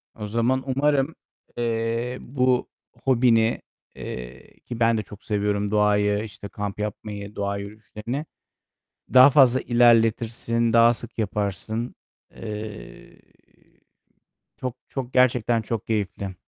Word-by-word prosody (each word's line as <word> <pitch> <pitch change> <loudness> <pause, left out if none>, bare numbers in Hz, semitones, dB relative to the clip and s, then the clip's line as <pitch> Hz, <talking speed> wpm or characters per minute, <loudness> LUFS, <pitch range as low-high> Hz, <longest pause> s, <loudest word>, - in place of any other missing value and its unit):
O 105 -1 -6
zaman 120 +4 +1
umarım, 145 +1 +1 0.4
eee, 115 +1 -1
bu 125 -1 0 0.3
hobini, 115 -3 +3 0.3
eee, - - -9
ki 120 -1 -8
ben 115 0 +3
de 110 - -2
çok 105 +2 -13
seviyorum 105 0 -1
doğayı, 105 0 +2
işte, 105 -1 -9
kamp 100 +1 -5
yapmayı, 105 -1 -5
doğa 100 0 -2
yürüyüşlerini 105 +7 -6 0.9
daha 130 +2 +9
fazla 130 -3 +5
ilerletirsin, 115 -1 +2
daha 115 +1 +6
sık 120 0 -10
yaparsın. 105 +2 -3 0.4
Eee, 105 -1 -8 1.4
çok 130 -1 -4
çok 130 -2 -5
gerçekten 120 -2 +3
çok 115 0 -4
keyifli. 100 -3 -2
115 Hz, 110 wpm, -24 LUFS, 105-120 Hz, 1.4 s, daha